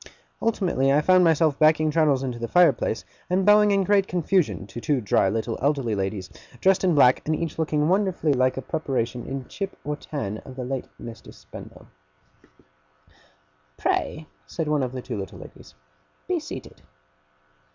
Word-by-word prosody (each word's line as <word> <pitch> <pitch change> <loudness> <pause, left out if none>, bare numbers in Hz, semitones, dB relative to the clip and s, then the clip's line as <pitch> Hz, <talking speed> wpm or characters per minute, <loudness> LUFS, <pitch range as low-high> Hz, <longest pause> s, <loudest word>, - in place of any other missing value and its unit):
Ultimately 180 -12 +1
I 140 - +4
found 185 +3 +5
myself 160 -3 +3
backing 155 0 +4
Traddles 150 -4 +2
into 125 -3 -4
the 115 - -3
fireplace, 180 +4 +2 0.2
and 185 +1 +1
bowing 210 0 +6
in 200 -1 +2
great 195 0 +2
confusion 175 - 0
to 100 +4 -9
two 145 0 +1
dry 100 -3 +2
little 110 +2 -3
elderly 135 -5 0
ladies, 95 -1 -3 0.3
dressed 190 +5 +3
in 180 -4 +3
black, 130 -3 +5
and 155 - +1
each 165 0 -4
looking 150 -1 +1
wonderfully 185 -5 +1
like 130 0 +1
a 135 - -4
preparation 125 -6 -3
in 135 -1 -5
chip 195 -1 -6
or 150 +1 -3
tan 110 -9 -5
of 130 - -12
the 130 -1 -5
late 130 0 -4
Mr. 115 -1 -10
Spenlow. - - -13 1.9
'Pray,' 155 - -1 0.2
said 160 -2 -4
one 150 -1 +1
of 125 -2 -2
the 130 -1 -6
two - - -5
little 95 - -7
ladies, - - -14 0.5
'be - - 0
seated. - - -9
150 Hz, 165 wpm, -24 LUFS, 125-170 Hz, 1.9 s, bowing